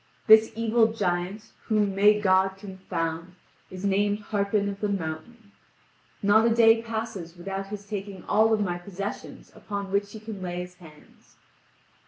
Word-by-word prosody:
This 220 0 +7
evil 225 0 +2
giant, 185 0 -2
whom 210 -3 +1
may 210 +2 +5
God 190 -1 +2
confound, 180 -3 -5 0.3
is 185 +1 -7
named 205 +1 +2
Harpin 200 0 +1
of 200 0 -5
the 210 - -1
Mountain. 200 +5 -5 0.7
Not 215 +3 +5
a - - +4
day 225 0 +5
passes 220 -7 -5
without 195 +2 -5
his 205 0 -7
taking 200 -2 -6
all 220 +1 +3
of 220 -1 +2
my 175 -3 -2
possessions 200 +2 -7
upon 200 -2 -6
which 200 +1 0
he 220 - -8
can 215 -2 -8
lay 180 -1 -4
his 180 0 -9
hands. 155 -4 -18
200 Hz, 155 wpm, -26 LUFS, 185-215 Hz, 0.7 s, This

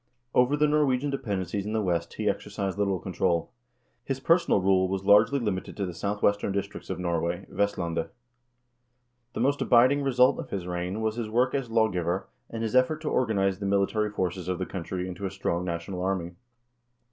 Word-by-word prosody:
Over 125 +4 +3
the 150 0 +3
Norwegian 145 -2 +2
depend 105 -9 -2
encies 100 +3 -3
in 105 +2 -4
the 110 - +1
West 85 -3 -1
he - - -2
exercised 95 -2 -2
little 100 -2 +1
control. 90 -2 -1 0.5
His 135 -1 -3
personal 165 - +3
rule 95 0 +3
was 95 +1 -3
largely 105 +7 +6
limited 105 -6 -3
to 100 - -1
the 90 - -5
southwestern 100 +2 0
districts 100 0 -4
of 95 - -2
Norway 85 -1 -2
— - - -25
Vest 100 +1 0
landet. 85 -2 -2 1.2
The - - -3
most 140 +3 +1
abiding 130 +4 +5
result 130 -2 +3
of - - -6
his 95 -3 -4
reign 90 +4 -3
was 110 +1 -1
his 115 -3 -3
work 125 +4 +2
as 135 -4 -2
law 115 -1 +3
giver, 90 -1 -2 0.2
and 115 0 -4
his 115 +2 -2
effort 130 +5 +3
to 155 - -2
organize 100 -6 +1
the 100 - -2
military 100 +2 +1
forces 90 -3 -3
of 90 -1 -1
the 95 - -2
country 90 0 -4
into 95 +2 -4
a - - -4
strong 90 -2 -2
national 85 +1 -4
army. 90 -2 -1
100 Hz, 195 wpm, -27 LUFS, 90-115 Hz, 1.2 s, largely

